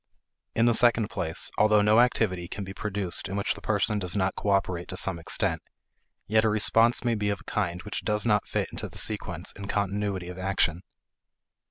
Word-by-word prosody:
In 115 Hz, -, +3 dB
the 120 Hz, -, +4 dB
second 115 Hz, -2 st, +3 dB
place, 80 Hz, -1 st, -3 dB
although 105 Hz, -1 st, +5 dB
no 105 Hz, +2 st, +5 dB
activity 105 Hz, -8 st, +1 dB
can 100 Hz, +2 st, -6 dB
be 95 Hz, 0 st, -7 dB
produced 100 Hz, -2 st, -3 dB
in 95 Hz, -, -4 dB
which 100 Hz, -, 0 dB
the -, -, -12 dB
person 105 Hz, 0 st, +1 dB
does 90 Hz, -2 st, -2 dB
not 95 Hz, -1 st, +1 dB
cooperate 95 Hz, -3 st, 0 dB
to 95 Hz, -, -6 dB
some 90 Hz, -3 st, +1 dB
extent, 80 Hz, -, -1 dB, 0.6 s
yet 110 Hz, +1 st, +3 dB
a 110 Hz, -, +3 dB
response 115 Hz, +2 st, +3 dB
may 120 Hz, -2 st, +1 dB
be 105 Hz, -2 st, -1 dB
of 100 Hz, -, -2 dB
a -, -, -16 dB
kind 90 Hz, -4 st, -2 dB
which 105 Hz, -, -5 dB
does 105 Hz, 0 st, 0 dB
not 105 Hz, -3 st, +2 dB
fit -, -, -2 dB
into -, -, -5 dB
the -, -, -14 dB
sequence -, -, -2 dB
and 100 Hz, 0 st, -8 dB
continuity 100 Hz, -2 st, -2 dB
of 90 Hz, 0 st, -8 dB
action. 95 Hz, -3 st, 0 dB
100 Hz, 200 wpm, -27 LUFS, 95-105 Hz, 0.6 s, although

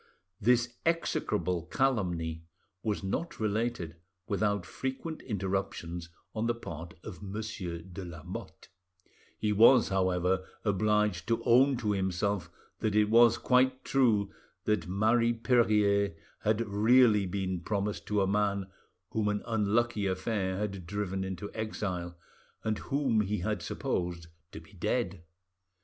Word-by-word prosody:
'" 95 Hz, 0 st, -40 dB
This 120 Hz, 0 st, +1 dB
execrable 90 Hz, -, 0 dB
calumny 90 Hz, -11 st, 0 dB, 0.4 s
was 105 Hz, -2 st, -2 dB
not 100 Hz, -, -3 dB
related 110 Hz, -6 st, -1 dB, 0.3 s
without 100 Hz, -2 st, 0 dB
frequent 135 Hz, -, -4 dB
interruptions 95 Hz, -5 st, -3 dB, 0.2 s
on 110 Hz, +1 st, -1 dB
the 120 Hz, -, +1 dB
part 85 Hz, -6 st, -8 dB
of 95 Hz, -5 st, -8 dB
Monsieur 100 Hz, -4 st, -5 dB
de 95 Hz, +1 st, -8 dB
Lamotte. 85 Hz, -3 st, -8 dB, 0.7 s
He 105 Hz, -1 st, 0 dB
was, 115 Hz, +5 st, +7 dB
however, 95 Hz, -1 st, +1 dB, 0.2 s
obliged 105 Hz, -1 st, +1 dB
to 115 Hz, -, 0 dB
own 130 Hz, +2 st, +5 dB
to 110 Hz, -3 st, -1 dB
himself 95 Hz, 0 st, -1 dB, 0.3 s
that 105 Hz, -1 st, 0 dB
it 105 Hz, 0 st, +3 dB
was 120 Hz, 0 st, +7 dB
quite 130 Hz, +1 st, +2 dB
true 110 Hz, -7 st, +3 dB, 0.3 s
that 105 Hz, -5 st, +1 dB
Marie 110 Hz, +5 st, +3 dB
Perier 105 Hz, -5 st, +3 dB, 0.2 s
had 110 Hz, +1 st, +1 dB
really 105 Hz, 0 st, +5 dB
been 95 Hz, -1 st, -2 dB
promised 100 Hz, +2 st, -2 dB
to 105 Hz, -2 st, +2 dB
a -, -, +1 dB
man 100 Hz, -1 st, 0 dB, 0.4 s
whom 110 Hz, -1 st, 0 dB
an 105 Hz, 0 st, 0 dB
unlucky 110 Hz, -1 st, +1 dB
affair 95 Hz, 0 st, -1 dB
had 100 Hz, -4 st, -4 dB
driven 95 Hz, -1 st, -2 dB
into 95 Hz, +1 st, -5 dB
exile, 95 Hz, -6 st, -3 dB, 0.5 s
and 110 Hz, -1 st, -1 dB
whom 135 Hz, -6 st, +1 dB
he 105 Hz, -1 st, -1 dB
had 105 Hz, -1 st, -1 dB
supposed 85 Hz, +2 st, -2 dB, 0.3 s
to -, -, -8 dB
be 80 Hz, +5 st, -18 dB
dead. 95 Hz, -1 st, -1 dB
105 Hz, 130 wpm, -30 LUFS, 95-115 Hz, 0.7 s, was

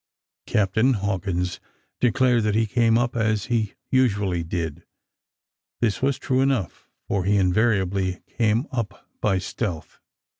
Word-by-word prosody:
Captain 110 Hz, +6 st, +2 dB
Hawkins 95 Hz, -4 st, -2 dB, 0.4 s
declared 125 Hz, +1 st, +3 dB
that 105 Hz, -1 st, 0 dB
he 115 Hz, +1 st, +3 dB
came 115 Hz, +1 st, +3 dB
up 120 Hz, 0 st, 0 dB
as 110 Hz, -2 st, +1 dB
he 110 Hz, -3 st, 0 dB, 0.2 s
usually 105 Hz, -9 st, +2 dB
did. 80 Hz, -2 st, -4 dB, 1.0 s
This 110 Hz, -4 st, 0 dB
was 135 Hz, 0 st, +1 dB
true 130 Hz, -1 st, 0 dB
enough, 135 Hz, -10 st, -1 dB, 0.2 s
for 100 Hz, -2 st, 0 dB
he 100 Hz, +2 st, +2 dB
invariably 95 Hz, -2 st, +1 dB
came 115 Hz, +2 st, +2 dB
up 115 Hz, -7 st, -4 dB
by 100 Hz, -3 st, +2 dB
stealth. 95 Hz, -2 st, -4 dB
105 Hz, 125 wpm, -24 LUFS, 95-120 Hz, 1.0 s, declared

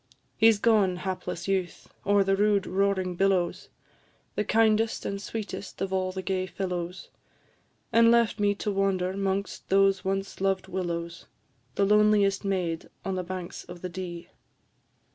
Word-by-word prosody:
He 225 Hz, +1 st, +6 dB
's 215 Hz, -, 0 dB
gone, 205 Hz, -4 st, +3 dB
hapless 180 Hz, -1 st, -4 dB
youth! 190 Hz, -2 st, -2 dB
o'er 200 Hz, 0 st, +5 dB
the 195 Hz, 0 st, +2 dB
rude 205 Hz, -1 st, +2 dB
roaring 190 Hz, -1 st, 0 dB
billows, 185 Hz, -2 st, +1 dB, 0.6 s
The -, -, 0 dB
kindest 220 Hz, +1 st, +2 dB
and 200 Hz, 0 st, -3 dB
sweetest 210 Hz, -2 st, -6 dB
of 190 Hz, 0 st, -2 dB
all 185 Hz, -1 st, 0 dB
the 190 Hz, 0 st, -5 dB
gay 185 Hz, 0 st, -1 dB
fellows, 180 Hz, -1 st, -4 dB, 0.8 s
And 230 Hz, 0 st, +6 dB
left 235 Hz, -2 st, +3 dB
me 205 Hz, 0 st, +2 dB
to 205 Hz, +1 st, -2 dB
wander 190 Hz, -2 st, 0 dB
'mongst 195 Hz, 0 st, -2 dB
those 195 Hz, 0 st, +3 dB
once 195 Hz, 0 st, -3 dB
loved 195 Hz, -1 st, 0 dB
willows, 170 Hz, -2 st, -4 dB, 0.5 s
The 200 Hz, -, +3 dB
loneliest 210 Hz, -1 st, +4 dB
maid 180 Hz, -4 st, -2 dB, 0.2 s
on 195 Hz, -, -1 dB
the 185 Hz, -, -1 dB
banks 180 Hz, -1 st, -6 dB
of 175 Hz, 0 st, -11 dB
the 180 Hz, -, -3 dB
Dee. 175 Hz, -1 st, -7 dB
195 Hz, 150 wpm, -27 LUFS, 185-205 Hz, 0.8 s, He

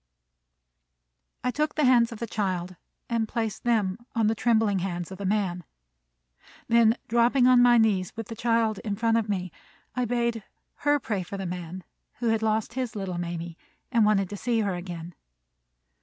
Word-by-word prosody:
I 250 Hz, -, +1 dB
took 300 Hz, +3 st, -1 dB
the 300 Hz, -, +2 dB
hands 245 Hz, -2 st, +5 dB
of 230 Hz, -, -7 dB
the 235 Hz, -, -3 dB
child, 185 Hz, -5 st, -2 dB, 0.3 s
and 230 Hz, -2 st, 0 dB
placed 225 Hz, -2 st, -3 dB
them 215 Hz, -4 st, +1 dB, 0.2 s
on 225 Hz, -1 st, +2 dB
the 215 Hz, -, +3 dB
trembling 220 Hz, -3 st, +2 dB
hands 175 Hz, -1 st, -4 dB
of 190 Hz, -, -8 dB
the 200 Hz, -, -2 dB
man. 190 Hz, -4 st, 0 dB, 1.0 s
Then, 230 Hz, 0 st, +4 dB
dropping 240 Hz, +2 st, +3 dB
on 250 Hz, -1 st, +6 dB
my 245 Hz, -1 st, +6 dB
knees, 205 Hz, -5 st, +2 dB
with 225 Hz, -1 st, -6 dB
the 225 Hz, -, -7 dB
child 230 Hz, -2 st, +1 dB
in 210 Hz, -4 st, -3 dB
front 225 Hz, +2 st, +2 dB
of 220 Hz, -2 st, -1 dB
me, 185 Hz, -3 st, -2 dB, 0.4 s
I 250 Hz, -1 st, 0 dB
bade 235 Hz, -2 st, -1 dB, 0.3 s
her 290 Hz, 0 st, +2 dB
pray 210 Hz, -7 st, -2 dB
for 185 Hz, +3 st, -6 dB
the 195 Hz, -, -4 dB
man 180 Hz, 0 st, -6 dB, 0.3 s
who 235 Hz, -1 st, -1 dB
had 225 Hz, -1 st, +1 dB
lost 220 Hz, +1 st, 0 dB
his 250 Hz, -2 st, -3 dB
little 190 Hz, -4 st, -3 dB
Mamie, 170 Hz, -1 st, -5 dB, 0.3 s
and 235 Hz, -3 st, +4 dB
wanted 205 Hz, -2 st, +3 dB
to 205 Hz, -, -5 dB
see 230 Hz, +1 st, 0 dB
her 200 Hz, -3 st, 0 dB
again. 175 Hz, -1 st, -6 dB
220 Hz, 180 wpm, -26 LUFS, 190-235 Hz, 1.0 s, on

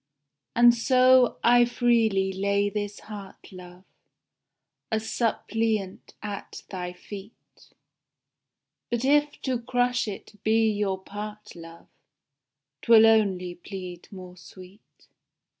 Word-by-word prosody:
And 240 Hz, 0 st, +7 dB
so 255 Hz, +1 st, +4 dB
I 240 Hz, 0 st, +6 dB
freely 225 Hz, -5 st, +1 dB
lay 200 Hz, +1 st, 0 dB
chis 205 Hz, -1 st, -5 dB
heart, 205 Hz, -2 st, -11 dB
love, 180 Hz, 0 st, -13 dB, 1.1 s
A 220 Hz, -, +1 dB
suppliant 220 Hz, -3 st, -2 dB
at 205 Hz, -2 st, -7 dB
thy 180 Hz, -2 st, -5 dB
feet, 200 Hz, +3 st, -13 dB, 1.2 s
But 240 Hz, +1 st, -2 dB
if 290 Hz, +1 st, +2 dB
to 255 Hz, -3 st, -1 dB
crush 245 Hz, 0 st, 0 dB
it 210 Hz, 0 st, -9 dB
be 220 Hz, 0 st, +2 dB
your 205 Hz, -2 st, -1 dB
part, 210 Hz, +2 st, -9 dB
love, 165 Hz, 0 st, -12 dB, 1.0 s
'Twill 225 Hz, -1 st, +6 dB
only 195 Hz, -5 st, +2 dB
plead 180 Hz, -1 st, -9 dB
more 185 Hz, -2 st, -11 dB
sweet. 185 Hz, +3 st, -16 dB
210 Hz, 105 wpm, -26 LUFS, 190-235 Hz, 1.2 s, And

